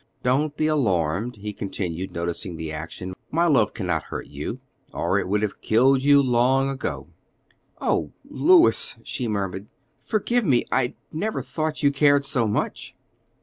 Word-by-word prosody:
"Do 125 - +1
not 150 +1 -1
be 155 - +1
alarmed," 110 - 0
he 105 0 -6
continued, 95 -3 -4
noticing 85 +1 -4
the 80 -1 -5
action; 80 +4 -6 0.2
"my 170 +3 +2
love 145 -7 +3
cannot - - -2
hurt - - -6
you, - - -6 0.3
or - - 0
it - - -3
would 105 +2 0
have 105 - -3
killed 130 +4 +4
you 140 0 +6
long 130 +2 +2
ago." 135 -1 -4 0.7
"Oh, - - 0 0.2
Louis," 370 +8 +4
she 125 - -3
murmured, 100 -1 -3 0.3
"forgive 240 +3 0
me; 130 - +2
I 125 -1 +1 0.2
never 210 +8 -2
thought 155 -1 -3
you 140 - +5
cared 145 0 +3
so 120 -4 +1
much." 105 - -3
125 Hz, 155 wpm, -24 LUFS, 100-145 Hz, 0.7 s, you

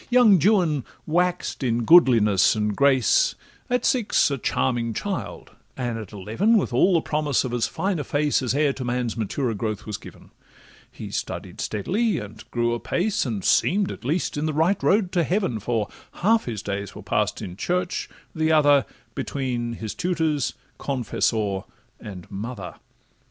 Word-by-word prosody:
Young 240 -6 +6
Juan 175 - +3 0.2
wax'd 175 -1 0
in 120 -1 0
goodliness 115 - +5
and 105 -1 -1
grace; 135 -4 +3 0.3
At 250 0 0
six 235 - +2
a 140 - -2
charming 115 -2 -1
child, 200 -3 -5 0.3
and 120 -3 -2
at 105 -4 -9
eleven 110 - +1
With 200 - -1
all 185 -1 +4
the 165 - +3
promise 150 -3 0
of 125 - -4
as 120 -2 +1
fine 190 +1 -2
a - - -2
face 145 +2 +1
As 130 0 -1
e'er 145 -1 +2
to 130 - -6
man's 120 -2 -2
maturer 115 +2 -2
growth 105 0 -4
was 105 -2 -4
given: - - -14 0.6
He - - -8
studied - - -5
steadily, 205 - 0
and 110 0 -8
grew 120 0 0
apace, 180 - -1
And 105 -5 -3
seem'd, 200 +2 +2
at - - -9
least, 150 +4 -1
in 150 +2 -1
the 155 - -1
right 170 +6 +2
road 195 -2 +2
to 175 - +2
heaven, 180 - 0
For 110 0 -1 0.3
half 220 +5 +2
his 110 -4 -5
days 100 0 -4
were - - -9
pass'd - - 0
at 90 +1 -8
church, 180 0 -1 0.2
the 160 0 +1
other 145 -3 +4 0.3
Between 120 -4 -3
his 110 -2 -5
tutors, 160 -6 -1 0.2
confessor, 110 -6 -1 0.3
and 95 -4 -9
mother. 100 -1 -6
135 Hz, 165 wpm, -24 LUFS, 110-175 Hz, 0.6 s, Young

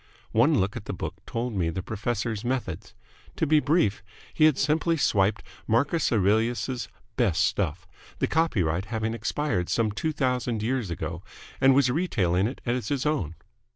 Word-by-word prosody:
One 125 +5 +4
look 95 +2 0
at 105 - -6
the - - -4
book - - -6
told 120 +1 -3
me 90 -5 0
the 90 +3 -4
professor's 110 +1 -2
methods. 110 -7 -3 0.4
To - - +1
be 155 0 +4
brief, 145 - +2 0.3
he 155 - +4
had 155 -4 +4
simply 160 +3 +1
swiped 100 -6 +2 0.2
Marcus 140 +9 +2
Aurelius's 115 +4 +1 0.3
best 95 -8 +2
stuff, 85 -4 -1 0.3
the - - +1
copyright 95 - +1
having 110 +1 -2
expired 115 -4 -1
some 110 -2 +1
two 155 +10 -2
thousand 125 -6 -1
years 120 -3 -1
ago, 85 +1 -4 0.4
and 135 0 +6
was 135 -2 +4
retailing 100 - +1
it 130 - -7
as 120 -3 -1
his 140 +1 -1
own. 130 - -1
115 Hz, 160 wpm, -26 LUFS, 95-135 Hz, 0.4 s, and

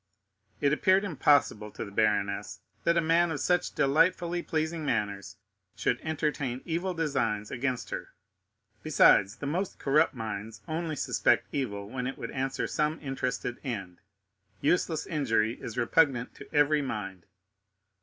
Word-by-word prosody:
It 140 0 +3
appeared 190 +5 +3
impossible 145 - +2
to - - -5
the 100 - -10
baroness 100 -1 0 0.2
that 170 0 +3
a - - +4
man 165 +2 +3
of 155 -3 -3
such 180 +6 +1
delightfully 170 +4 +2
pleasing 160 0 -2
manners 100 - -2 0.4
should 125 - 0
entertain 145 -5 -2
evil 175 +2 -2
designs 115 -10 -1
against 125 -1 -2
her; - - -5 0.7
besides, 100 +3 +5
the 145 - -7
most 175 +7 -2
corrupt 145 0 +2
minds 110 -1 -5
only 160 0 -2
suspect - - +2
evil 100 -8 -3
when 125 +3 -4
it 135 - -5
would - - -6
answer 135 0 -2
some 150 +1 -1
interested 135 -3 -3
end—useless 130 - -3
injury 115 -7 0
is 115 - -7
repugnant 125 0 +2
to - - -13
every 150 +1 +3
mind. 100 -9 -5
135 Hz, 135 wpm, -29 LUFS, 110-160 Hz, 0.7 s, besides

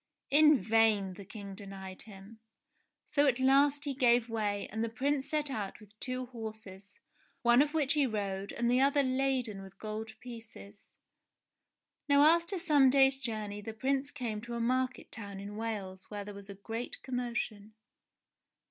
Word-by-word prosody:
In 300 +1 +7
vain 215 -4 +3
the 200 +1 -10
King 200 -1 -8
denied 190 -1 -9
him; 205 +1 -13 0.7
so 290 0 +2
at 260 -2 +2
last 280 +2 +4
he 280 - -1
gave 245 -3 +3
way 210 -3 -1
and 220 +2 -2
the 230 - -1
Prince 270 +4 -1
set 300 -2 0
out 205 -6 -4
with 210 -1 -17
two 255 0 -3
horses, 220 -5 -9 0.5
one 240 +2 +6
of 295 +2 0
which 295 -3 +2
he 290 -3 +3
rode, 200 -3 -3
the 240 +2 +3
other 280 +1 +4
laden 255 -5 0
with 195 0 -13
gold 220 +1 -6
pieces. 225 -4 -12 1.1
Now 285 0 +6
after 335 +4 +4
some 300 -6 +5
days' 270 0 +4
journey 215 -4 -3
the 220 +1 -6
Prince 270 +4 0
came 225 -6 -4
to 235 +1 -6
a - - -2
market 255 +2 -1
town 200 -3 -7
in 200 +1 -7
Wales 205 -4 -5
where 205 -1 -5
there 205 - -7
was 200 0 -11
a 200 - -7
great 225 +4 -6
commotion. 235 -4 -3
230 Hz, 165 wpm, -32 LUFS, 205-270 Hz, 1.1 s, In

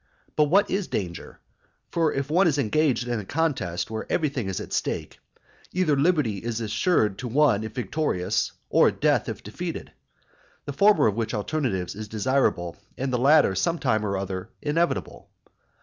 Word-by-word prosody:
But 150 - +4
what 195 +7 +3
is 195 0 -1
danger? 85 -4 -5 0.5
For 165 -2 +2
if 135 0 -2
one 180 +3 +4
is 150 -3 +1
engaged 130 -1 +1
in 120 -2 -1
a - - -5
contest 125 - -1
where 110 0 -5
everything 140 - 0
is 95 - -3
at - - -7
stake, - - -3 0.5
either 175 -5 +2
liberty 140 - +2
is 115 +1 -3
assured 110 - +1
to 125 - -4
one 125 -4 +3
if 110 +2 -7
victorious, 110 - -1 0.2
or - - +5
death - - +1
if - - -6
defeated, - - -6 0.7
the 140 - -4
former 200 -2 +5
of 105 - +3
which 115 +2 -2
alternatives 105 - -2
is 110 +1 -7
desirable, 105 -6 0 0.2
and 130 0 -2
the 125 - +1
latter 145 -4 +5
some 165 - 0
time 110 -8 +1
or 100 -2 -1
other 95 -1 -4
inevitable. 165 +3 -1
125 Hz, 165 wpm, -25 LUFS, 105-155 Hz, 0.7 s, or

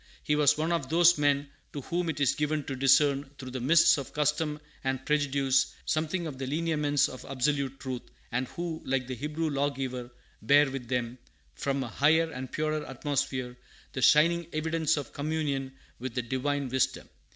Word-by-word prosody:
He 150 - +1
was 145 0 +4
one 160 +2 0
of 165 -6 -1
those 170 0 +5
men 145 -1 +1 0.2
to 145 - -4
whom 170 +5 -2
it 160 - -3
is 140 -3 +3
given 150 0 -1
to 135 - -5
discern 140 +1 +3
through 130 -1 -8
the 130 - -4
mists 165 +5 +5
of 135 - -8
custom 150 +1 0 0.2
and 130 0 -2
prejudice 140 -2 +1
something 160 +4 -1
of 140 -5 -6
the 135 - -3
lineaments 150 -1 +1
of 130 - -9
absolute 135 0 -1
truth, 130 -2 -4 0.3
and 125 +1 -1
who, 170 +1 -5
like 130 -1 -1
the 130 - -5
Hebrew 150 +5 -2
lawgiver, 135 -3 -2 0.3
bear 140 +4 +5
with 135 -3 -6
them, 125 0 -2 0.3
from 140 -1 -2
a - - -5
higher 160 +8 +3
and 130 -2 -6
purer 155 0 -1
atmosphere, 135 -2 -3 0.4
the 130 - -3
shining 165 +4 +5
evidence 160 0 0
of 145 - -5
communion 145 -3 -2 0.3
with 125 -1 -5
the 125 - -1
Divine 135 +3 -1
Wisdom. 130 +1 0
145 Hz, 175 wpm, -29 LUFS, 130-155 Hz, 0.4 s, those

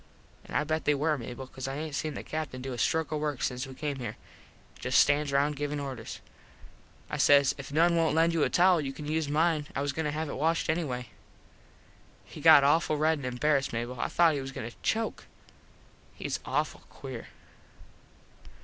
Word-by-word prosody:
An - - -9
I - - +3
bet 155 +1 -2
they 150 - +3
were 155 +2 +1
Mable 125 0 -7
cause 130 0 -7
I 135 - -4
aint 155 0 -5
seen 155 +2 -3
the - - -6
Captin 155 -5 -4
do 130 0 -5
a - - -6
stroke 160 +4 +1
of 155 - -1
work 150 -3 -2
since 125 +1 -2
we 130 - -10
come 145 -1 -3
here. 120 -4 -5 0.6
Just 125 - +1
stands 145 0 +4
round 145 +2 +2
givin 145 0 -2
orders. 130 -5 -6 0.9
I - - -4
says, 140 -2 +5
"If 140 0 -8
noone 170 +3 +4
wont 165 -2 +2
lend 165 +1 +3
you 165 - +1
a - - +3
towel 180 -2 +4
you 135 -2 -4
can 150 - -8
use 155 0 -1
mine. 155 0 +1
I 140 - -1
was 145 - 0
just 140 - -14
goin 160 - -1
to 150 - 0
have 155 +2 -3
it - - -5
washed 160 +3 +1
anyway." 125 -8 -3 1.2
He - - -11
got 140 - +8
awful 155 +2 +3
red 155 +1 +2
and 130 - -4
embarassed 135 +2 +1
Mable. 120 +2 -4
I - - 0
thought 170 -2 +4
he 140 - -2
was 135 0 -6
goin 130 -4 -6
to - - -19
choke. 225 0 -1 0.9
Hes - - -3
awful - - -1
queer. - - -8
145 Hz, 210 wpm, -29 LUFS, 135-155 Hz, 1.2 s, got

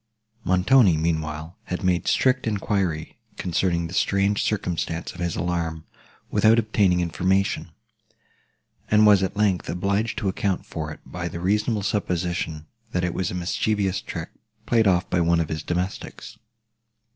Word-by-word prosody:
Montoni, 95 0 +4
meanwhile, 80 0 -2
had 90 - -4
made 90 -2 +1
strict 130 -2 +2
enquiry 95 -6 -1 0.2
concerning 85 -1 0
the 85 - -7
strange 100 +1 +1
circumstance 85 -5 -2
of 90 - -13
his 85 -2 -1
alarm, 85 -3 -2 0.5
without 110 +1 +5
obtaining 105 -5 +2
information; 95 +4 0 1.2
and 105 0 +5
was, 105 -2 +6
at 95 +1 -2
length, 100 -4 +1
obliged 100 +6 -1
to 115 -7 -1
account 95 -1 -1
for 80 -2 -5
it 75 - -10
by 85 -1 -5
the 85 0 -6
reasonable 105 +3 0
supposition, 90 -5 -2 0.3
that 90 - 0
it 90 -1 0
was 95 -3 -1
a - - -5
mischievous 100 +2 0
trick 80 0 -6 0.4
played 115 -2 +3
off 90 -1 +2
by 90 - +1
one 85 0 +3
of 80 - -1
his 80 -1 -3
domestics. 90 +4 -4
90 Hz, 145 wpm, -24 LUFS, 85-100 Hz, 1.2 s, was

